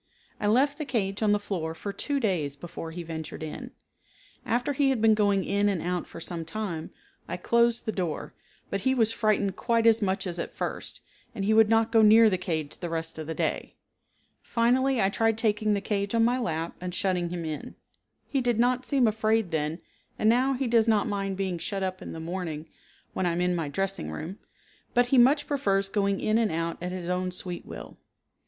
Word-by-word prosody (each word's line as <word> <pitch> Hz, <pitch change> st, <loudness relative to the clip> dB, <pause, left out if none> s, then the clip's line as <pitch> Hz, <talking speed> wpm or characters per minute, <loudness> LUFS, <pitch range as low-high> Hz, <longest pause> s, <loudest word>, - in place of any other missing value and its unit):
I 205 Hz, -, 0 dB
left 275 Hz, +7 st, +3 dB
the 305 Hz, -, -2 dB
cage 200 Hz, -6 st, -1 dB
on 215 Hz, -1 st, +3 dB
the 205 Hz, -, +4 dB
floor 175 Hz, -6 st, -4 dB
for 200 Hz, +4 st, -5 dB
two 280 Hz, +7 st, -1 dB
days 170 Hz, -, 0 dB
before 165 Hz, +2 st, -7 dB
he 170 Hz, +2 st, -6 dB
ventured 160 Hz, -1 st, -6 dB
in. 155 Hz, -, -6 dB, 0.8 s
After 245 Hz, +4 st, +1 dB
he 275 Hz, 0 st, +2 dB
had 265 Hz, -3 st, +1 dB
been 220 Hz, 0 st, +5 dB
going 205 Hz, -3 st, +2 dB
in 205 Hz, +1 st, +2 dB
and 195 Hz, -4 st, 0 dB
out 180 Hz, +1 st, -2 dB
for -, -, -10 dB
some 170 Hz, 0 st, -5 dB
time, 170 Hz, -2 st, -4 dB, 0.4 s
I -, -, -4 dB
closed 235 Hz, 0 st, +2 dB
the 220 Hz, -, 0 dB
door, 175 Hz, -7 st, -3 dB, 0.4 s
but 200 Hz, -, -1 dB
he 260 Hz, +4 st, +2 dB
was 225 Hz, -2 st, +3 dB
frightened 210 Hz, -4 st, +1 dB
quite 230 Hz, -1 st, +1 dB
as 225 Hz, 0 st, +5 dB
much 195 Hz, -1 st, 0 dB
as 175 Hz, -2 st, -4 dB
at -, -, -5 dB
first, -, -, -3 dB, 0.3 s
and 195 Hz, -3 st, -2 dB
he 215 Hz, -, +3 dB
would 220 Hz, -1 st, +6 dB
not 225 Hz, 0 st, +3 dB
go 225 Hz, -1 st, +5 dB
near 220 Hz, +1 st, +7 dB
the 185 Hz, -, 0 dB
cage 160 Hz, -5 st, -3 dB
the 175 Hz, -, -5 dB
rest 165 Hz, -1 st, -4 dB
of 155 Hz, -, -6 dB
the 160 Hz, -, -3 dB
day. -, -, -2 dB, 0.7 s
Finally 255 Hz, +2 st, +2 dB
I 195 Hz, -, +3 dB
tried 225 Hz, +1 st, +1 dB
taking 215 Hz, -1 st, +1 dB
the 200 Hz, -, -2 dB
cage 200 Hz, +1 st, -1 dB
on 225 Hz, 0 st, +4 dB
my 245 Hz, +2 st, +2 dB
lap 165 Hz, -7 st, -2 dB
and 180 Hz, 0 st, -4 dB
shutting 180 Hz, -3 st, 0 dB
him 170 Hz, -1 st, -4 dB
in; 155 Hz, -2 st, -5 dB, 0.5 s
he 275 Hz, -, 0 dB
did 240 Hz, -2 st, +1 dB
not 250 Hz, +1 st, +2 dB
seem 270 Hz, -4 st, +3 dB
afraid 220 Hz, -2 st, +1 dB
then 155 Hz, +1 st, -1 dB, 0.4 s
and 215 Hz, -, +1 dB
now 255 Hz, +4 st, +4 dB
he 265 Hz, +1 st, -1 dB
does 230 Hz, -2 st, +3 dB
not 215 Hz, -2 st, +3 dB
mind 195 Hz, -2 st, -2 dB
being 190 Hz, -3 st, -2 dB
shut 195 Hz, +2 st, -3 dB
up 185 Hz, 0 st, -3 dB
in -, -, -7 dB
the 165 Hz, -, -6 dB
morning 165 Hz, -2 st, -4 dB, 0.5 s
when 185 Hz, -, 0 dB
I 170 Hz, -, +1 dB
am 175 Hz, -, -1 dB
in 180 Hz, 0 st, +1 dB
my 165 Hz, -3 st, -2 dB
dressing 195 Hz, -, -2 dB
room, 165 Hz, -, -6 dB, 0.6 s
but 245 Hz, 0 st, +4 dB
he 265 Hz, -, +5 dB
much 285 Hz, +5 st, +5 dB
prefers 195 Hz, -9 st, 0 dB
going 200 Hz, -1 st, +1 dB
in 215 Hz, +1 st, +2 dB
and 225 Hz, -3 st, +1 dB
out 165 Hz, +1 st, -2 dB
at 180 Hz, +1 st, -3 dB
his 180 Hz, -2 st, -5 dB
own 180 Hz, 0 st, -1 dB
sweet 180 Hz, -1 st, -5 dB
will. -, -, -9 dB
200 Hz, 215 wpm, -27 LUFS, 175-225 Hz, 0.8 s, near